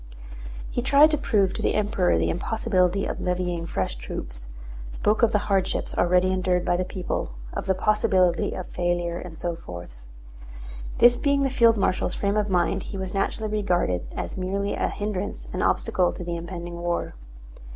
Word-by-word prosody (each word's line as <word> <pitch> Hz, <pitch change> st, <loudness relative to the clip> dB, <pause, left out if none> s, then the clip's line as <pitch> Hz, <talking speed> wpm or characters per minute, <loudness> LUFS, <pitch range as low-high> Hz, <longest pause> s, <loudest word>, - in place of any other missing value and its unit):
He -, -, -1 dB
tried 285 Hz, +4 st, +6 dB
to 300 Hz, -, +2 dB
prove 200 Hz, -8 st, +2 dB
to -, -, -4 dB
the -, -, +1 dB
Emperor 205 Hz, -4 st, +2 dB
the -, -, +1 dB
impossibility 190 Hz, -1 st, +1 dB
of -, -, -4 dB
levying 180 Hz, -2 st, -1 dB
fresh 95 Hz, -, -2 dB
troops, -, -, -7 dB, 0.4 s
spoke 210 Hz, -, +1 dB
of 230 Hz, -1 st, +5 dB
the 210 Hz, -, +3 dB
hardships 195 Hz, -2 st, 0 dB
already 180 Hz, +1 st, +3 dB
endured 180 Hz, -1 st, +1 dB
by -, -, +2 dB
the 180 Hz, -, 0 dB
people, 180 Hz, -, -4 dB, 0.2 s
of -, -, -4 dB
the 190 Hz, -, +2 dB
possibility 190 Hz, -3 st, +2 dB
of 185 Hz, -, -5 dB
failure 175 Hz, -1 st, -1 dB
and 170 Hz, -3 st, -9 dB
so 175 Hz, +1 st, -2 dB
forth. 85 Hz, -, -10 dB, 0.9 s
This 240 Hz, 0 st, +6 dB
being 280 Hz, -1 st, +2 dB
the 270 Hz, -, +1 dB
field 230 Hz, -3 st, +5 dB
marshal's 185 Hz, -2 st, 0 dB
frame 200 Hz, 0 st, 0 dB
of 210 Hz, -1 st, +1 dB
mind 180 Hz, -2 st, +1 dB
he 195 Hz, -, -5 dB
was 190 Hz, -1 st, -4 dB
naturally 210 Hz, +2 st, -1 dB
regarded 175 Hz, -, 0 dB
as -, -, -4 dB
merely 195 Hz, +2 st, -1 dB
a -, -, 0 dB
hindrance 205 Hz, -1 st, -4 dB
and -, -, -2 dB
obstacle 180 Hz, -1 st, +2 dB
to -, -, -7 dB
the 170 Hz, 0 st, -3 dB
impending 170 Hz, 0 st, -6 dB
war. 175 Hz, 0 st, -2 dB
185 Hz, 175 wpm, -25 LUFS, 175-210 Hz, 0.9 s, tried